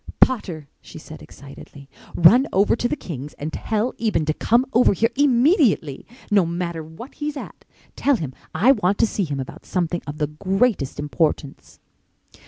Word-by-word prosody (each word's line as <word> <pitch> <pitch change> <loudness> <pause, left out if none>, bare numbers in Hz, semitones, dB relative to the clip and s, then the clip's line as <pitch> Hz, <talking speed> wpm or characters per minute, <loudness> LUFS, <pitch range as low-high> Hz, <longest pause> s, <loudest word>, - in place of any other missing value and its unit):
"Potter," 180 - +1
she - - -12
said, - - -11
excitedly, 140 0 -13 0.3
"run 240 - +6
over 200 +3 +3
to 240 - -1
the - - -2
Kings' 150 - -8
and 155 +2 -6
tell 220 +2 -2
Eben 210 -9 0
to 155 - 0
come 235 +10 +2
over 245 -1 +4
here 230 +5 +1
immediately—no 240 - +2
matter 170 -1 -4
what 160 - -11
he's 295 0 -5
at. - - -10 0.3
Tell 285 0 +2
him 155 - -5 0.2
I 215 +11 +5
want 205 -6 +1
to - - +3
see 205 -3 -2
him 145 -3 -4
about 130 - -8
something 175 -1 -1
of 145 +1 -6
the 150 - 0
greatest 190 - -1
importance." 150 -1 -2
185 Hz, 165 wpm, -22 LUFS, 155-240 Hz, 0.3 s, run